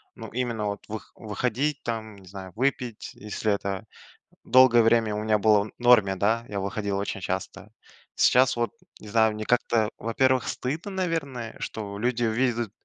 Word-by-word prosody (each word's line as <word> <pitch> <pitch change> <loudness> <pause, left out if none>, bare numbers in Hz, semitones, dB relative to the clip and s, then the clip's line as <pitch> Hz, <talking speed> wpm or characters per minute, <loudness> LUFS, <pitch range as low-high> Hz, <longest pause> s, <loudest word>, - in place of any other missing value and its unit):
Ну - - -8
именно, 120 -4 -2
вот, 100 0 -4
вых 110 0 -7
выходить, 125 +6 -2
там, 110 -2 -4
не 95 -2 -16
знаю, 95 -1 -9
выпить, 125 -2 -2
если 105 0 -2
это 100 -1 -3 0.6
долгое 120 -1 +6
время 115 -2 +3
у - - -2
меня 110 -1 +2
было 105 -1 +4
в 110 - -9
норме, 120 -6 +5
да, 110 +5 +1
я 100 -1 -3
выходил 100 +1 -2
очень 100 -1 -3
часто. 95 +3 -5 0.5
Сейчас, 125 0 +4
вот, 120 -3 0 0.3
не 105 - -11
знаю, 110 0 +3
мне 110 0 -5
как-то, 115 -2 +2
во-первых, 130 +2 +1
стыдно, 155 +10 -3
наверное, 160 -11 -3
что 100 -2 -5
люди 120 +1 0
увидят, 115 -1 0
110 Hz, 165 wpm, -26 LUFS, 105-125 Hz, 0.6 s, долгое